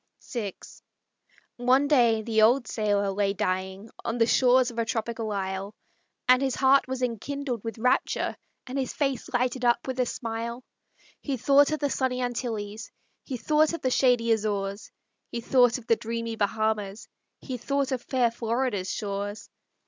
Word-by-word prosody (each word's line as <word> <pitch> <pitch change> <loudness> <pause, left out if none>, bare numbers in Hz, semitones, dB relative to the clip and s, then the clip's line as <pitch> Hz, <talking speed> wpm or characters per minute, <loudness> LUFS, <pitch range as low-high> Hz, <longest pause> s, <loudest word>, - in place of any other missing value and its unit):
VI 210 -6 -3 1.0
One 255 +3 +3
day 235 -6 +4
the 220 -1 +1
old 240 +4 +4
sailor 205 -2 0
lay 195 0 0
dying 190 +2 -3
On 230 - -2
the 230 - +4
shores 250 +1 +4
of 235 - -6
a - - +2
tropical 225 -1 -3
isle, 195 +1 -3 0.5
And 255 +1 +6
his 265 -2 0
heart 270 0 +4
was 260 -1 -3
enkindled 250 0 -3
with 225 0 -5
rapture, 250 +3 +1 0.3
And 265 +2 -3
his 260 - -2
face 275 -4 -1
lighted 250 0 0
up 240 0 +2
with 260 -1 -4
a 250 - +2
smile. 235 +1 -4 0.6
He 275 -3 -2
thought 280 +4 +4
of 310 - 0
the 285 -1 0
sunny 255 -1 0
Antilles, 225 -4 -4 0.3
He 260 - -4
thought 305 +5 +2
of 335 - -4
the 255 - +1
shady 245 -3 +3
Azores, 205 -2 -1 0.4
He 235 - -4
thought 245 0 +3
of 245 - -12
the 230 - +4
dreamy 230 0 -4
Bahamas, 215 -1 -1 0.3
He 255 -2 -5
thought 275 +3 -1
of 255 -2 -1
fair 245 -3 +1
Florida's 230 -4 -1
shores. 205 0 -4
235 Hz, 165 wpm, -27 LUFS, 215-255 Hz, 1.0 s, And